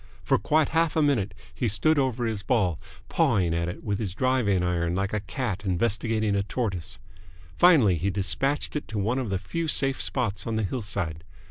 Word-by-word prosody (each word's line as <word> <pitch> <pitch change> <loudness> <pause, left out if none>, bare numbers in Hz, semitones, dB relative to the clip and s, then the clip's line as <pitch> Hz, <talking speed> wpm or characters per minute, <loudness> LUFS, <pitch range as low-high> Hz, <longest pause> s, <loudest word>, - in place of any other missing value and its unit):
For - - +2
quite 150 +9 +2
half 165 -1 +1
a 160 - +3
minute 110 -9 +1 0.2
he 120 - -1
stood 115 +9 +2
over 125 -3 0
his 110 -3 -2
ball, 95 - +1 0.3
pawing 90 -5 +2
at 85 +1 -1
it 90 - -8
with 100 -2 -1
his 95 -5 -3
driving 125 -8 +2
iron 85 -1 0
like 95 +2 -1
a 105 - +1
cat 100 +1 -4
investigating 110 +2 0
a 100 - +2
tortoise. 100 -5 -3 0.6
Finally 135 - +6
he 90 +5 0
despatched 135 +11 -1
it 150 - -3
to 110 - -5
one 110 +6 0
of 125 -5 -3
the 95 - 0
few 165 - -3
safe 135 -3 +1
spots 105 -7 -2
on 115 - -1
the 110 - 0
hillside. 100 -7 -3
105 Hz, 195 wpm, -26 LUFS, 95-130 Hz, 0.6 s, Finally